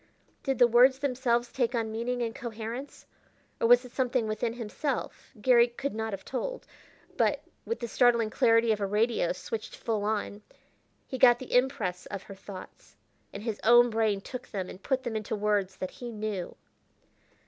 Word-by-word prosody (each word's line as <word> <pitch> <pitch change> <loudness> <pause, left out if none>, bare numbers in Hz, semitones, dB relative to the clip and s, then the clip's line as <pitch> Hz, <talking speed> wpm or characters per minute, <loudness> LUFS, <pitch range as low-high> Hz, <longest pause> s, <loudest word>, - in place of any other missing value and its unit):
Did 270 -2 -1
the 245 - +7
words 250 +3 +6
themselves 250 -3 0
take 245 -1 0
on 225 -2 -1
meaning 240 +2 -2
and 225 -1 -3
coherence, 235 +4 -7 0.5
or - - +3
was 245 +1 +6
it 250 - -11
something 250 -3 0
within 215 +2 -1
himself? 245 +4 -4
Garry 240 +1 +5
could 270 +4 -4
not 220 0 -3
have 195 -1 -6
told. - - -4 0.5
But, - - +1 0.2
with 460 - -3
the 235 - -2
startling 235 -2 +3
clarity 230 0 +4
of 210 -1 0
a 200 - 0
radio 210 -2 +1
switched 215 +4 -5
full 220 -3 -2
on, 210 -1 -2 0.6
he 260 - -6
got 240 -1 +7
the 255 - -8
impress 230 -8 +1
of 195 -2 -6
her 200 - -10
thoughts, 190 -1 -11 0.4
and 200 - -8
his 220 -3 -3
own 240 +1 +6
brain 215 -3 +1
took 250 +4 -8
them 190 -3 -4
and 185 - -12
put 260 +4 -1
them 235 -3 -3
into 215 0 -2
words 205 -2 0
that 185 - -4
he 245 - -8
knew. 210 -5 -4
230 Hz, 180 wpm, -29 LUFS, 210-245 Hz, 0.6 s, the